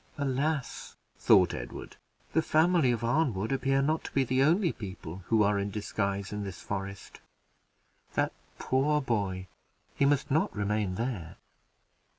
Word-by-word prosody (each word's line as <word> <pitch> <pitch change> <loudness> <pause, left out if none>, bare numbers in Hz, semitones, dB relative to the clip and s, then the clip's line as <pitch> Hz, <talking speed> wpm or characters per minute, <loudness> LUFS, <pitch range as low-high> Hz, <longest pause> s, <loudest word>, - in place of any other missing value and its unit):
"Alas!" 140 0 -2 0.2
thought - - +5
Edward, - - -7 0.4
"the 160 - +4
family 160 -4 +3
of 115 -1 -2
Arnwood 115 -5 +1
appear 135 0 +1
not 155 +3 0
to - - -6
be 135 - +3
the 130 +1 +1
only 170 +5 +3
people 95 -3 -8
who 110 -2 +4
are 100 0 +2
in 100 +1 -2
disguise 100 -1 -2
in 105 0 -3
this 95 -3 -6
forest. 100 0 -6 1.0
That - - +1 0.2
poor 145 +3 +1
boy! 100 -8 -1 0.5
he 140 - +3
must 140 -1 +2
not 155 +4 +1
remain 105 -2 -1
there." 110 -8 -4
115 Hz, 145 wpm, -29 LUFS, 100-140 Hz, 1.0 s, thought